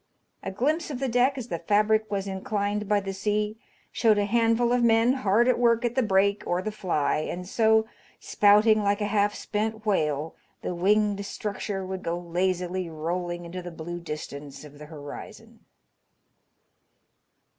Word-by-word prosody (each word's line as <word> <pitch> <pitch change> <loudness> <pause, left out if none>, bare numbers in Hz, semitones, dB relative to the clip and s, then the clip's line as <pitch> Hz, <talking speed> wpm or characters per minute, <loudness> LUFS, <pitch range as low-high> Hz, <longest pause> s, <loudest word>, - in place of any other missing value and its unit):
A - - -4
glimpse 300 - -1
of 280 - -4
the 270 +1 -2
deck 250 +3 +2
as 245 -2 -6
the 170 - -3
fabric 215 +4 +2
was 200 -1 -2
inclined 205 +1 -2
by 210 -1 +3
the 195 0 -5
sea 210 +2 -1 0.3
showed 220 -3 +3
a 205 - +2
handful 230 +2 +2
of 245 - +2
men 230 +2 +4
hard 235 -2 +2
at 255 - +3
work 235 0 +3
at 240 - 0
the 260 - +2
brake 200 -2 +2
or 175 - +1
the 215 +4 -3
fly, 175 -10 0
and 175 +4 -4
so, 220 +1 +3 0.3
spouting 210 +1 +4
like 200 +1 +1
a 210 - 0
half 205 0 +1
spent 220 +1 -3
whale, 155 -6 0 0.3
the - - -2
winged 200 +3 +2
structure 200 -1 -4
would 190 0 -5
go 170 +1 -2
lazily 180 +1 -2
rolling 175 +2 -4
into 180 +2 -6
the 175 - -7
blue 170 +1 -6
distance 150 -4 -7
of 145 -1 -13
the 150 - -10
horizon. 145 -2 -10
205 Hz, 165 wpm, -26 LUFS, 175-220 Hz, 0.3 s, men